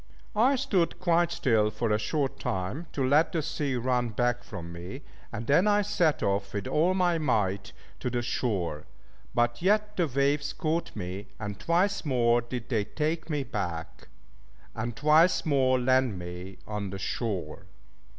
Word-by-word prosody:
I 250 +6 +4
stood 200 -11 0
quite 175 -1 +2
still 110 -9 +2
for 110 +1 -2
a 105 - +2
short 135 +5 -1
time, 95 - -3
to 135 -2 0
let 150 +5 +4
the 165 -3 -1
sea 140 -3 -2
run 125 0 0
back 120 +2 0
from 85 0 -8
me, 90 +12 -8 0.3
and 115 0 -5
then 160 - +4
I 205 0 +4
set 175 -6 +1
off 100 0 -1
with 100 -1 -2
all 175 +5 +2
my 175 -3 +2
might 100 -9 0 0.3
to - - -2
the 120 0 -1
shore, 95 - -2 0.5
but 120 0 +1
yet 210 +3 +2
the 175 -3 +2
waves 140 +2 +1
caught 165 0 -2
me, 95 +1 -5
and 105 -2 -5
twice 185 +4 +1
more 120 -4 +3
did 120 0 -6
they 110 -5 +1
take 155 +6 -2
me 150 -3 0
back, 85 -9 -5 0.7
and 120 +1 -4
twice 155 +7 +4
more 130 -4 +3
land 130 -4 +2
me 90 +2 -7
on 105 -2 -4
the 95 - -5
shore. 95 -4 -3
125 Hz, 165 wpm, -28 LUFS, 105-160 Hz, 0.7 s, I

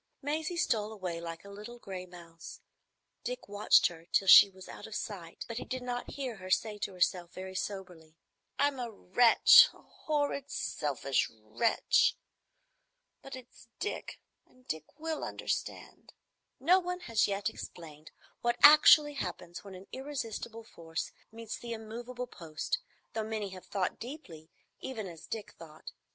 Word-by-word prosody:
Maisie 310 +4 -2
stole 215 -9 +1
away 180 -5 -5
like 165 +1 -7
a - - -10
little 210 +4 -9
gray 185 -5 -7
mouse. 170 -2 -11 0.6
Dick - - -5
watched 205 +1 +4
her 165 -1 -2
till 195 - +2
she 200 - +11
was 190 -1 -13
out - - -9
of 220 - -8
sight, 175 -7 -6
but 230 - -5
he - - -5
did 255 -1 -5
not 245 0 -4
hear 260 -5 -4
her 185 -1 -9
say 210 +2 +1
to 200 - -3
herself, 180 -1 0
very 185 0 -7
soberly, 185 -5 -6 0.4
"I'm 285 -2 +1
a 240 -1 -3
wretch,—a 225 +3 +6
horrid, 290 -2 -2
selfish 140 - -1
wretch. 110 - +1 1.0
But 270 - -8
it's 255 -1 -14
Dick, 420 - -4 0.3
and 255 0 -26
Dick 155 -1 -3
will 320 0 -3
understand." - - -5 0.5
No 350 +8 +5
one 360 0 -4
has 225 -8 +2
yet 200 +1 -1
explained 155 -7 -8 0.3
what 240 0 +1
actually 300 0 +9
happens 180 -8 -6
when 195 -2 -10
an 185 +1 -11
irresistible 235 -5 -5
force 165 -7 -6 0.2
meets 225 0 -7
the 235 -1 -5
immovable 235 +3 -6
post, 170 - -4 0.3
though 220 - -1
many 215 -2 -3
have 185 -1 -11
thought 195 -3 -2
deeply, 190 - -9 0.3
even 230 -6 -5
as 170 -4 -10
Dick 220 -2 -5
thought. 155 -2 -11
215 Hz, 150 wpm, -31 LUFS, 180-250 Hz, 1.0 s, she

